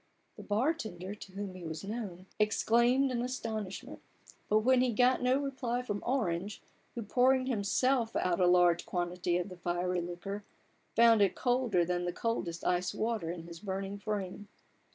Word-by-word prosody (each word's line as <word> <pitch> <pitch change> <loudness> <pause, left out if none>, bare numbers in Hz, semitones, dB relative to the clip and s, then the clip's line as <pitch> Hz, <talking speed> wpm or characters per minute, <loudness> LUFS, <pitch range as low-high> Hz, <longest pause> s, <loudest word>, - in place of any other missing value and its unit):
The - - -10
bar 235 +10 +1
tender, 190 - -6
to 200 -2 -11
whom 200 -1 -5
he 185 -1 -10
was 160 -1 -5
known, 195 -4 -5
exclaimed 235 +5 +3
in 240 -1 -1
astonish 220 -6 -4
ment; - - -11 0.5
but 230 +5 +4
he 250 -2 +2
got 250 +3 +3
no 250 +1 +3
reply 255 -3 -2
from 205 -4 -3
Orange, 205 -6 -1 0.4
who, 235 - -3
pouring 255 +4 +3
himself 240 +1 +1
out 180 -1 +1
a 180 - +4
large 175 -1 +4
quantity 175 0 -1
of 180 +2 -3
the 180 - -10
fiery 175 +1 -1
liquor, 180 +4 -5 0.5
found 230 -2 +6
it 200 - +3
colder 245 -8 +2
than 175 0 -1
the 175 - -2
coldest 175 -6 -2
iced 180 0 +1
water 220 -7 -1
in 170 -1 -5
his 170 0 -10
burning 195 +1 -4
frame. 200 -1 -4
205 Hz, 170 wpm, -32 LUFS, 180-240 Hz, 0.5 s, found